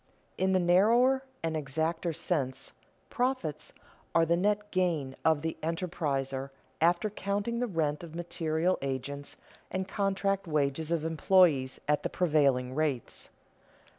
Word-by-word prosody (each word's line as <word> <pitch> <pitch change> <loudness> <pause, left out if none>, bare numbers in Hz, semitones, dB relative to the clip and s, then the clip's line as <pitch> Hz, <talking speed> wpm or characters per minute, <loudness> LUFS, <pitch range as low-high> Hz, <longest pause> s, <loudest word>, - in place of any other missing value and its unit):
_In 190 0 +1
the 185 - +4
narrower 230 +10 +4 0.2
and 165 -1 -1
exacter 160 +4 -1
sense 140 -5 -2 0.4
profits 245 - -2 0.4
are 165 0 +5
the 170 +1 +3
net 205 +3 0
gain 165 -8 0
of 160 -2 +3
the 160 - -2
enterpriser 145 -6 -2 0.3
after 175 +5 +3
counting 205 +4 -2
the 245 - 0
rent 155 -5 -1
of 165 -1 -9
material 170 +1 -1
agents 140 +1 -4 0.3
and 190 0 -3
contract 195 -1 0
wages 150 +1 0
of 165 -2 0
employees 160 -4 +3
at 150 0 +2
the - - -2
prevailing 140 -7 +2
rates. 145 -5 -2
165 Hz, 130 wpm, -30 LUFS, 145-190 Hz, 0.4 s, are